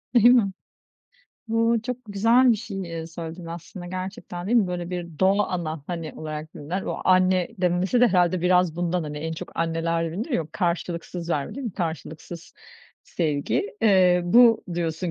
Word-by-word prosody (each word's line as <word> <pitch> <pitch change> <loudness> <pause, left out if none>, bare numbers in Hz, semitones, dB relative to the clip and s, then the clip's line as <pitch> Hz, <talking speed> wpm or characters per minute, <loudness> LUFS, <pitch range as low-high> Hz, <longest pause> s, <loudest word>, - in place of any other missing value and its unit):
Değil 235 -2 +6
mi? 235 -6 +4 1.0
Bu 230 +1 +2
çok 250 +1 -3
güzel 230 +5 +4
bir 230 - +3
şey, 205 -3 -6
eee, 165 -2 -5
söyledin, 165 +1 -8
aslında, 170 +2 -8
gerçekten 185 -1 -6
değil 235 +4 +2
mi? 210 - +2
Böyle 175 -1 -4
bir 170 -3 -6
doğa 200 +2 +3
ana, 160 -4 -3
hani 165 -3 -5
olarak 155 0 -6
bilinen 175 +7 -4
o - - -4
anne 185 -1 +3
demesi 180 +6 +1
de - - +7
herhâlde 180 -2 +2
biraz 180 -2 +3
bundan, 175 0 0
hani, 150 -1 -5
en 160 +2 -4
çok 160 - -7
anneler 165 0 -1
bilinir 215 - -4
ya, 240 - +1
o - - -15
karşılıksız 170 -1 -3
verme 145 -4 -2
değil 275 - -6
mi, 220 - -4
karşılıksız 165 0 -6 0.5
sevgi. 165 - -1
Eee, 185 -4 +5
bu 230 +4 +5
diyorsun 170 +1 -2
180 Hz, 170 wpm, -24 LUFS, 165-195 Hz, 1.0 s, de